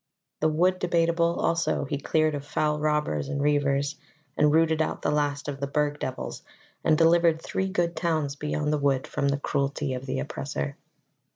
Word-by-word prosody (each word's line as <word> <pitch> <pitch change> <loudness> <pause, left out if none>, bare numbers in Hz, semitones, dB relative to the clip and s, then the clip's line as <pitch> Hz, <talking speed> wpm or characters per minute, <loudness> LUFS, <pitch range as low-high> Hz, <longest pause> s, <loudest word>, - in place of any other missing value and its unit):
The 155 - +3
Wood 180 +4 +2
Debateable 170 -1 +1
also 170 -3 +1
he 140 +1 -3
cleared 155 +2 +1
of 145 -1 -4
foul 150 +1 0
robbers 150 - 0
and 140 - -2
reivers, 145 0 +1 0.4
and 150 0 +4
rooted 160 0 +3
out 160 - -2
the - - +1
last 145 -1 -1
of 140 -1 -4
the 140 - -2
Burg 145 +1 0
devils, 130 0 -5 0.4
and 155 -1 +4
delivered 165 0 +4
three 190 +3 -2
good 175 -3 0
towns 155 -5 -1
beyond 150 0 -1
the 150 - +1
wood 135 -2 +1
from 140 - -1
the 140 0 +1
cruelty 140 0 -1
of 130 +1 -6
the - - -2
oppressor. 70 +1 -4
150 Hz, 180 wpm, -26 LUFS, 140-165 Hz, 0.4 s, and